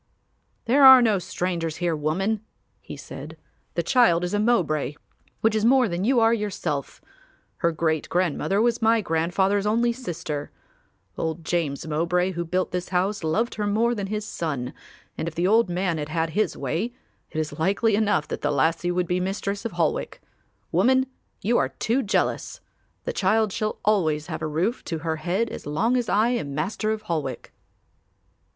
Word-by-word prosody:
"There 270 +4 +4
are 265 -1 +11
no 220 -5 +3
strangers 170 -3 -3
here, 175 -2 0
woman," 190 +8 -1 0.4
he - - -9
said. - - -9 0.4
"The - - 0
child 230 -10 +4
is 180 - -2
a 205 - +1
Mowbray 155 - +1 0.5
which 220 0 +3
is 215 -1 0
more 255 +1 +5
than 175 -1 -2
you 255 +1 +4
are 225 0 +4
yourself; 185 -10 -3 0.6
her 170 -2 +1
great 160 -1 -1
grandmother 180 +2 0
was 235 -1 +1
my 225 0 +4
grandfather's 190 +4 +1
only 235 +2 +2
sister. 165 - -5 0.7
Old 160 0 -3
James 160 -5 -1
Mowbray 170 +4 0
who 170 -1 -3
built 180 +2 -1
this 180 0 -3
house 190 +2 0
loved 215 +10 0
her 210 -1 -2
more 225 +4 +2
than 200 -4 -3
his 210 +1 -3
son 140 -10 -3 0.5
and 160 - -2
if 165 - -5
the 175 - 0
old 220 +1 +4
man 175 -2 -1
had 150 0 -4
had 160 0 -1
his 205 -1 0
way, 170 - -2 0.3
it - - -8
is 155 0 -4
likely 200 +6 +2
enough 205 -8 +1
that - - -5
the - - 0
lassie 160 +5 +1
would 180 0 0
be 180 +1 0
the 180 - -1
Mistress 200 +2 -3
of 230 - -3
Holwick. - - -1 0.5
Woman, 260 +1 +3 0.4
you 235 +4 +3
are 130 - +1
too 225 - 0
jealous. 210 -5 -1 0.4
The - - -3
child 210 +1 +2
shall 215 -2 -2
always 160 -8 +2
have 160 -2 -5
a 155 - -1
roof 175 +11 -1
to 165 - -3
her 160 -1 -1
head 185 +9 -1
as - - -8
long 220 +12 +1
as 245 -3 0
I 215 +3 +3
am 150 - -2
Master 205 +8 -2
of 215 0 -2
Holwick." 155 -9 -4
185 Hz, 180 wpm, -24 LUFS, 160-220 Hz, 0.7 s, are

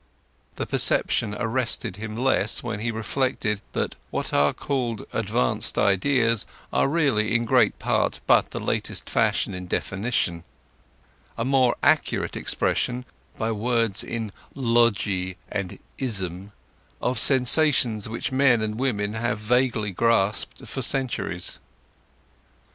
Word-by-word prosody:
The - - -3
perception 105 - +1
arrested 115 -4 -1
him 110 +1 -6
less 125 -4 +2
when 115 -3 -4
he 120 +2 -2
reflected 110 -1 -1
that - - -2
what - - -3
are 70 0 +4
called 120 -6 -3
advanced 60 -1 0
ideas 115 +3 +2 0.3
are - - +3
really 135 -8 +1
in 120 0 +2
great - - +3
part - - 0
but - - +4
the - - -5
latest - - -2
fashion - - +1
in 90 0 -6
definition—a 85 - -5
more 130 -2 +3
accurate - - +2
expression, 125 0 0 0.3
by 115 0 -1
words 115 -1 0
in 115 -3 -4 0.2
logy 105 -7 +1
and 100 -3 -4 0.2
ism, 95 -6 -3 0.5
of 125 +1 0
sensations 130 -5 +4
which 115 +3 -3
men 130 -4 +3
and 110 +1 -3
women 105 -6 -1
have 110 -1 -1
vaguely 115 -1 +1
grasped 105 0 0
for 135 - -5
centuries. 130 -9 -1
115 Hz, 120 wpm, -24 LUFS, 100-125 Hz, 0.5 s, are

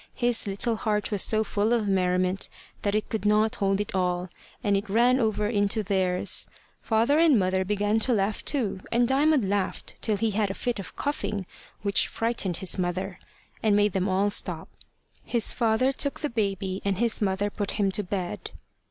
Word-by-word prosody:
His 240 -3 +2
little 220 +4 -1
heart 210 +1 -1
was 205 -2 +1
so 220 0 +4
full 215 +2 0
of 225 -3 +1
merriment 185 0 +1 0.3
that 205 0 0
it 215 - -1
could 220 -3 -3
not 210 +1 +2
hold 195 0 +1
it 205 - -3
all, 180 -1 -1 0.3
and 205 -2 +2
it 200 +1 -2
ran 240 +5 +3
over 215 -3 0
into 210 0 +1
theirs. 190 -1 0 0.3
Father 230 +7 +2
and 320 -6 +5
mother 190 -1 +1
began 205 +2 0
to 250 - 0
laugh 205 0 0
too, 230 -10 -1
and 240 +1 +3
Diamond 275 -3 +3
laughed 200 -1 -3
till 215 -2 +1
he 225 +1 0
had 205 0 0
a 195 - -4
fit 245 -3 -2
of 195 - -8
coughing 210 -9 -2 0.4
which 200 -1 +3
frightened 225 -6 -1
his 190 0 0
mother, 185 +1 -2 0.4
and 215 -2 +3
made 205 0 +3
them 190 +1 0
all 195 +2 +1
stop. - - 0 0.5
His 235 -2 +1
father 230 +3 +2
took 280 +1 -1
the 295 - -2
baby, 195 -4 -2
and 200 -2 0
his 230 +1 +1
mother 200 0 0
put 205 -1 -3
him 200 -2 +1
to 210 - -1
bed. 185 -2 -4
205 Hz, 185 wpm, -26 LUFS, 195-225 Hz, 0.5 s, and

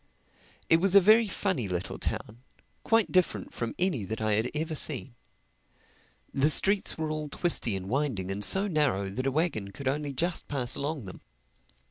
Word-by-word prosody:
It 165 - +5
was 190 +3 +1
a - - +11
very 215 +4 +5
funny 185 - -1
little 90 -1 -4
town, 115 +3 -5 0.4
quite 225 -2 +2
different 185 -1 0
from 115 -1 -4
any 175 - 0
that 110 +4 -4
I 110 -1 0
had 110 +4 +1
ever 160 +1 -2
seen. 135 -4 0 1.2
The 140 +2 +3
streets 195 +5 +4
were 160 -1 -3
all 155 -1 -4
twisty 140 - 0
and 95 -1 -5
winding 120 -7 -1
and 100 +1 -4
so 195 - +3
narrow 145 - 0
that 130 +7 -3
a - - +1
wagon 140 - -1
could 130 +7 -7
only 145 +1 -1
just 170 +6 -2
pass 130 -4 -2
along 145 -4 -4
them. 95 - -10
145 Hz, 175 wpm, -28 LUFS, 110-170 Hz, 1.2 s, a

